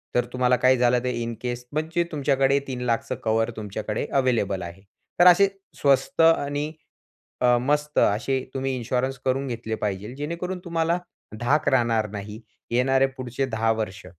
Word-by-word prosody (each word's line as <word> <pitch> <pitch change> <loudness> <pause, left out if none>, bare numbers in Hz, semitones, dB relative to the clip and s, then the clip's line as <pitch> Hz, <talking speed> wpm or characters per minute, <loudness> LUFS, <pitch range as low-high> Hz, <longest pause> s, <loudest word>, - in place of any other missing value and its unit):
तर 125 -1 +3
तुम्हाला 125 0 +3
काही 130 +1 +4
झालं 125 0 +3
तर - - -5
इन 120 -1 -3
केस 125 0 -4
म्हणजे 160 +3 0
तुमच्याकडे 140 -2 +2
₹3,00,000 125 -3 -2
कव्हर 115 +1 +1
तुमच्याकडे 105 0 -4
अव्हेलेबल 115 -8 +1
आहे. 85 +2 -9 0.4
तर 175 - +8
असे 180 +3 +7 0.3
स्वस्त 140 +2 +2
आणि 150 -2 +2 0.7
अ, 125 -1 +5
मस्त 150 +2 0
असे 120 +6 +2
तुम्ही 135 0 -2
इन्शुरन्स 130 +2 -2
करून 135 +1 0
घेतले 115 -2 -4
पाहिजे, 105 +2 -3
जेणेकरून 170 +6 -4
तुम्हाला 165 0 0 0.4
धाक 145 +6 +2
राहणार 115 -4 +2
नाही, 105 +2 -7 0.3
येणारे 135 +2 +3
पुढचे 130 +1 -2
10 115 -2 +1
वर्ष. 105 -4 -5
125 Hz, 150 wpm, -24 LUFS, 115-140 Hz, 0.7 s, तर